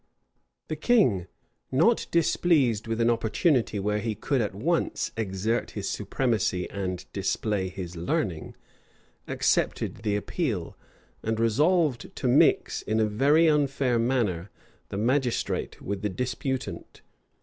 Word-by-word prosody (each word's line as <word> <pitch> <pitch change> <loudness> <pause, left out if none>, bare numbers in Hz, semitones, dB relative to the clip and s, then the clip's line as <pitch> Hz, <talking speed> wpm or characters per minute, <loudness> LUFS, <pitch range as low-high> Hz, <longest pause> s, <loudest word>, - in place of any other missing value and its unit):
The 155 - -3
king, 150 - +2 0.4
not 165 - +3
displeased 155 -9 +2
with 115 0 -2
an 115 0 +4
opportunity 115 - +1
where 105 +1 0
he 110 0 -2
could 130 +5 0
at 105 -3 -2
once 160 - -1
exert 110 +2 -1
his - - -3
supremacy 110 -8 -1
and 95 -2 -4
display 100 0 -1
his 90 -2 -7
learning, 85 0 -2 0.7
accepted - - 0
the 105 -2 -1
appeal; 105 - -2 0.5
and 110 0 -2
resolved 145 - +2
to - - -2
mix, 125 +4 +3
in 110 +1 -1
a 110 - +4
very 140 +10 +3
unfair 140 -5 +2
manner, 110 -8 0 0.4
the 100 - -4
magistrate 125 +3 0
with 100 0 -3
the 105 - -1
disputant. 125 - -4
115 Hz, 125 wpm, -27 LUFS, 100-135 Hz, 0.7 s, an